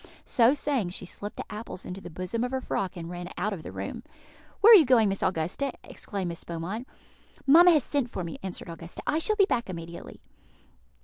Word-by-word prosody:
So 240 +3 +4
saying, 275 -10 -1
she 185 - -6
slipped 205 +3 -6
the - - -5
apples 210 -3 -7
into 185 +2 -6
the 175 - -8
bosom 185 +7 -3
of 250 - -1
her 265 +1 -1
frock, 195 -7 -3
and 165 -1 -6
ran 175 +1 -6
out 210 +3 -1
of 180 - -6
the - - -8
room. - - -5 0.6
"Where 455 +3 +10
are - - +13
you 360 - +8
going, 245 -5 +4
Miss 195 - -3
Augusta?" 180 - -1
exclaimed 195 -4 -5
Miss 170 - -6
Beaumont. 175 +9 -5 0.6
"Mamma 335 +6 +8
has 310 -6 +5
sent 275 -3 -1
for 185 - -4
me," 165 -2 -6
answered 190 -1 -6
Augusta; 165 +1 -8
"I 310 - +1
shall 430 +6 +2
be 400 -2 +5
back 235 - -1
immediately." 170 -1 -8
200 Hz, 210 wpm, -27 LUFS, 175-265 Hz, 0.6 s, are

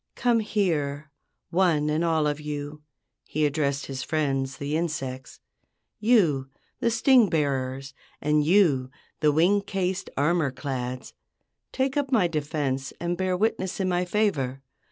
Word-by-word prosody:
"Come 240 -2 +2
here, 155 -9 -1 0.4
one 165 -4 +2
and 155 +2 +1
all 160 -2 +2
of 150 0 -1
you," 150 0 -5 0.4
he 155 0 -1
addressed 145 -1 0
his 135 -2 -5
friends, 135 -3 -1
the 145 +2 -3
insects. 135 -6 -4 0.6
"You, 170 - +3 0.3
the 235 - +2
sting 235 -1 +4
bearers, 135 -3 -1 0.3
and 150 0 +2
you, 150 -7 +3 0.3
the 150 -1 +4
wing 175 +7 +3
cased 190 -1 -2
armor 155 +1 +2
clads—take 130 - -5
up 280 -1 -1
my 215 -8 +4
defense 145 -4 -2
and 175 +1 -1
bear 185 0 0
witness 190 -2 -1
in 190 -1 0
my 180 0 +1
favor. 150 -10 -1
155 Hz, 135 wpm, -26 LUFS, 140-185 Hz, 0.6 s, sting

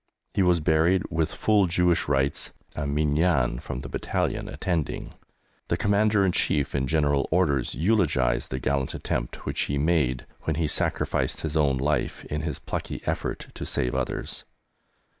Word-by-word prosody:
He - - +2
was 90 -2 +4
buried 80 +4 +3
with 80 -1 0
full 105 -3 +3
Jewish 90 0 +2
rites, 70 0 0 0.2
a 75 -2 -2
"Minyan" 75 -3 +2
from 65 - -5
the 70 - -7
battalion - - -2
attending. 85 -5 -2 0.5
The - - 0
Commander 105 0 +3
in 95 - +3
Chief 70 -5 +1
in 65 -1 0
General 75 -2 +2
Orders 75 -7 +1
eulogised 75 - +2
the 65 - -2
gallant 70 +4 -1
attempt - - -3
which - - -1
he 70 - 0
made 70 -5 +1 0.2
when 80 - -1
he 80 +1 0
sacrificed 75 - 0
his 80 -1 -3
own 70 -4 +3
life 70 +1 -1
in 75 +1 -3
his 75 -3 -3
plucky - - -5
effort - - -3
to - - -6
save - - -1
others. - - -2
75 Hz, 160 wpm, -26 LUFS, 70-85 Hz, 0.5 s, was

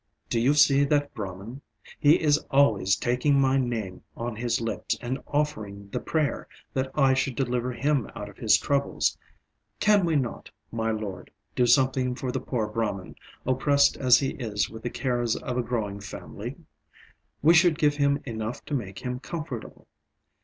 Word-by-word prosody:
do 115 - +2
you 135 +5 +3
see 140 -1 +5
that 145 0 +1
Brahman? 105 +5 -7 0.4
He 150 +3 +5
is 150 -2 +3
always 110 -9 +4
taking 125 +5 +1
my 135 0 +3
name 115 -7 -3 0.2
on 120 -1 -4
his 120 +1 -1
lips 115 -1 -2
and 130 +2 -3
offering 105 -9 -2
the - - -2
prayer 155 -3 -1 0.3
that 130 0 -1
I 135 -3 +4
should 130 -1 0
deliver 125 -1 -1
him 140 +1 0
out 105 - -6
of 105 - -13
his 110 - +4
troubles. 140 -1 0 0.6
Can 210 -2 +4
we 165 -2 +1
not, 130 -5 -2 0.2
my 115 -1 -1
lord, 105 -4 -4 0.3
do 125 - +3
something 130 0 +3
for 130 -1 -3
the - - -2
poor 115 -4 -2
Brahman, 105 -4 -3 0.3
oppressed 140 +2 +3
as 125 -3 +5
he 135 - 0
is 105 -5 -2
with 110 0 -9
the 120 - -3
cares 120 -2 -1
of 125 - -4
a 125 - +1
growing 110 -4 -3
family? 100 -2 -7 0.9
We 165 +3 +7
should 170 -2 +5
give 145 -2 +2
him 140 0 +2
enough 110 -1 -5
to - - -6
make 100 -8 -3
him 125 0 -3
comfortable. 150 -6 -7
125 Hz, 170 wpm, -26 LUFS, 110-140 Hz, 0.9 s, We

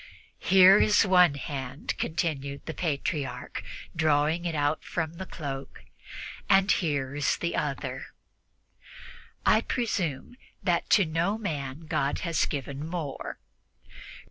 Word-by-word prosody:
"Here 190 +1 +7
is 210 +1 +4
one 180 -5 +5
hand," 140 -1 -4
continued 140 -4 -2
the 160 - -4
Patriarch, 150 -3 -3 0.3
drawing 155 +2 +2
it 170 -2 -1
out 145 +1 0
from 160 -2 -3
the 190 +2 -7
cloak, 140 -4 -7 0.7
"and 195 +1 +5
here 140 -6 0
is 145 -1 +1
the 170 - -2
other. 145 -3 -3 1.4
I 220 - +5
presume 200 - -2 0.3
that 175 -3 +1
to 200 - +5
no 165 +6 0
man 145 -8 -4
God 140 -2 -1
has 170 -3 +1
given 140 0 -4
more. 160 -4 -5
155 Hz, 115 wpm, -28 LUFS, 140-180 Hz, 1.4 s, Here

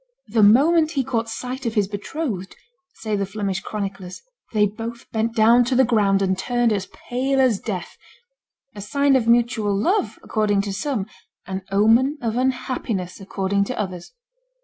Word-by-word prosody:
"The 225 - +2
moment 310 +10 +5
he 275 -4 +1
caught 235 -3 -2
sight 250 +2 -5
of 225 - -3
his 205 -3 +2
betrothed," 205 - -5 0.4
say 215 -2 -3
the 200 - 0
Flemish 200 -2 -3
chroniclers, 195 - -6 0.3
"they 210 -2 +3
both 225 +3 -6
bent 225 +1 -1
down 230 +2 +5
to 255 +2 0
the 260 - +5
ground 200 -4 +2
and 190 0 +1
turned 240 +4 +1
as 195 -2 -2
pale 265 +2 -2
as 250 -6 +3
death 190 -5 -5 0.8
a 205 - -8
sign 280 +6 +2
of 240 -3 +1
mutual 235 -3 +2
love 370 - 0
according 210 -2 +1
to 200 -1 -4
some, 210 0 -2 0.4
an 190 0 -4
omen 230 +8 +3
of 230 -3 -2
unhappiness 250 -7 -2
according 195 0 -1
to 255 - -5
others." 185 -4 -5
220 Hz, 165 wpm, -22 LUFS, 200-255 Hz, 0.8 s, moment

